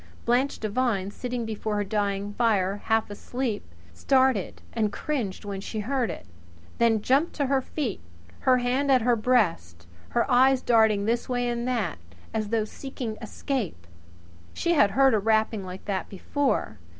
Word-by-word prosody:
Blanche 250 Hz, +4 st, +2 dB
Devine, 215 Hz, -3 st, -1 dB
sitting 245 Hz, +1 st, -4 dB
before 215 Hz, -1 st, -3 dB
her 205 Hz, -, +1 dB
dying 200 Hz, 0 st, -1 dB
fire 205 Hz, -4 st, +1 dB
half 225 Hz, -1 st, +1 dB
asleep, 245 Hz, +2 st, -3 dB, 0.3 s
started 260 Hz, -, +2 dB
and 215 Hz, -3 st, 0 dB
cringed 230 Hz, -11 st, -3 dB
when 200 Hz, -1 st, -4 dB
she 215 Hz, +1 st, -4 dB
heard 250 Hz, 0 st, 0 dB
it; 165 Hz, -, -7 dB, 0.5 s
then 225 Hz, -2 st, +3 dB
jumped 275 Hz, +8 st, +2 dB
to 285 Hz, -, 0 dB
her 270 Hz, 0 st, +2 dB
feet, 255 Hz, -5 st, -3 dB, 0.4 s
her 255 Hz, -1 st, +4 dB
hand 255 Hz, +3 st, +1 dB
at 255 Hz, -3 st, +4 dB
her 240 Hz, 0 st, +4 dB
breast 175 Hz, -, +1 dB, 0.2 s
her 235 Hz, -, +1 dB
eyes 260 Hz, 0 st, +4 dB
darting 220 Hz, -3 st, +4 dB
this 235 Hz, +3 st, 0 dB
way 245 Hz, -1 st, 0 dB
and 240 Hz, 0 st, -2 dB
that, 225 Hz, -, -1 dB, 0.3 s
as 215 Hz, -2 st, -2 dB
though 225 Hz, -1 st, +1 dB
seeking 245 Hz, -1 st, -6 dB
escape. 220 Hz, -, -4 dB, 0.7 s
She 345 Hz, -, +1 dB
had 210 Hz, -11 st, +5 dB
heard 265 Hz, +4 st, +4 dB
a 215 Hz, -, +3 dB
rapping 220 Hz, 0 st, +1 dB
like 185 Hz, 0 st, -8 dB
that 195 Hz, -2 st, -2 dB
before. 275 Hz, +8 st, -1 dB
225 Hz, 160 wpm, -26 LUFS, 205-255 Hz, 0.7 s, had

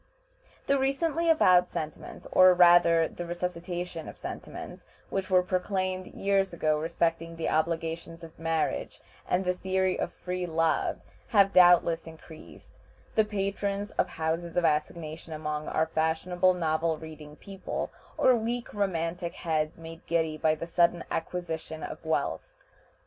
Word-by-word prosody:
The 280 Hz, 0 st, +2 dB
recently 320 Hz, +5 st, 0 dB
avowed 185 Hz, -, +5 dB
sentiments, 155 Hz, 0 st, -6 dB
or 185 Hz, 0 st, +7 dB
rather 175 Hz, -2 st, +6 dB
the 175 Hz, -, -7 dB
resuscitation 175 Hz, -1 st, -4 dB
of -, -, -11 dB
sentiments -, -, -8 dB, 0.3 s
which 190 Hz, 0 st, -2 dB
were 185 Hz, -1 st, +4 dB
proclaimed 185 Hz, 0 st, -2 dB
years 195 Hz, -1 st, 0 dB
ago 155 Hz, -2 st, +1 dB
respecting 165 Hz, +1 st, -1 dB
the 165 Hz, -, -2 dB
obligations 165 Hz, +1 st, -2 dB
of 160 Hz, -1 st, -12 dB
marriage 165 Hz, -1 st, -1 dB, 0.3 s
and 185 Hz, +1 st, +1 dB
the 180 Hz, -, +2 dB
theory 190 Hz, 0 st, 0 dB
of -, -, -2 dB
"free 180 Hz, 0 st, -4 dB
love," 165 Hz, 0 st, 0 dB, 0.3 s
have 200 Hz, -5 st, +4 dB
doubtless 175 Hz, -2 st, +5 dB
increased 160 Hz, 0 st, -14 dB, 0.3 s
the 220 Hz, -, +4 dB
patrons 200 Hz, 0 st, -2 dB
of -, -, 0 dB
houses 165 Hz, +2 st, -3 dB
of 175 Hz, -, +3 dB
assignation 155 Hz, +1 st, -2 dB
among 150 Hz, -1 st, -4 dB
our 160 Hz, -, +1 dB
fashionable 165 Hz, +3 st, +1 dB
novel 160 Hz, -1 st, 0 dB
reading 155 Hz, -1 st, -10 dB
people, 195 Hz, +3 st, -5 dB, 0.3 s
or 255 Hz, -, +5 dB
weak 235 Hz, +1 st, -3 dB
romantic 175 Hz, -3 st, -2 dB
heads 155 Hz, -1 st, -1 dB
made 165 Hz, 0 st, -10 dB
giddy 160 Hz, -2 st, 0 dB
by 155 Hz, 0 st, +2 dB
the 155 Hz, -, -6 dB
sudden 170 Hz, 0 st, +2 dB
acquisition 160 Hz, -2 st, -4 dB
of -, -, -7 dB
wealth. -, -, -2 dB
170 Hz, 140 wpm, -28 LUFS, 160-185 Hz, 0.3 s, or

